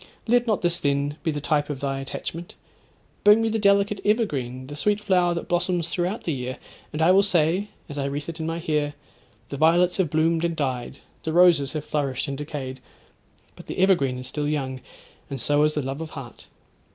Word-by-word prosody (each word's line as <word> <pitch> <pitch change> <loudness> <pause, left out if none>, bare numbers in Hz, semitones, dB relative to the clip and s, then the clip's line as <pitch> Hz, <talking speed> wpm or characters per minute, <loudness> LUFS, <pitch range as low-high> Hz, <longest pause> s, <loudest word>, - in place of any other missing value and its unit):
Let 245 +1 +3
not 215 -4 +1
this, 175 0 +1
then, 140 +1 0
be 165 - -1
the 150 -2 -1
type 145 0 0
of 145 -3 -4
thy 135 -1 -2
attachment; 165 +5 -6 0.7
bring 210 +2 +7
me 225 0 +1
the 220 0 0
delicate 200 0 +3
evergreen, 140 - 0
the 145 +2 -8
sweet 205 +7 +1
flower 180 -4 +2
that 170 - -4
blossoms 175 -1 0
throughout 180 +5 -2
the 165 - -1
year, 130 -1 -4 0.3
and 155 +1 -1
I 170 - +6
will 195 +1 +6
say, 185 0 +2 0.2
as 145 0 -6
I 140 - -1
wreathe 140 +1 -3
it 165 0 -6
in 160 - -3
my 165 0 -2
hair, 150 -3 -1 0.5
"The 140 - -5
violets 175 +4 +4
have 185 -5 +1
bloomed 160 +2 +2
and 170 -1 0
died—the 135 +2 -4
roses 170 -6 +5
have 155 -2 -4
flourished 140 -2 -1
and 140 - -3
decayed; 135 -2 -5 0.8
but - - -13
the - - -5
evergreen 175 -9 +3
is 125 - -6
still 145 +3 -2
young, 135 -3 -2 0.5
and 135 -2 -4
so 145 +4 +2
is 150 - 0
the 150 - 0
love 135 +4 -4
of 160 - -5
heart!" 135 -7 -10
155 Hz, 205 wpm, -24 LUFS, 140-180 Hz, 0.8 s, bring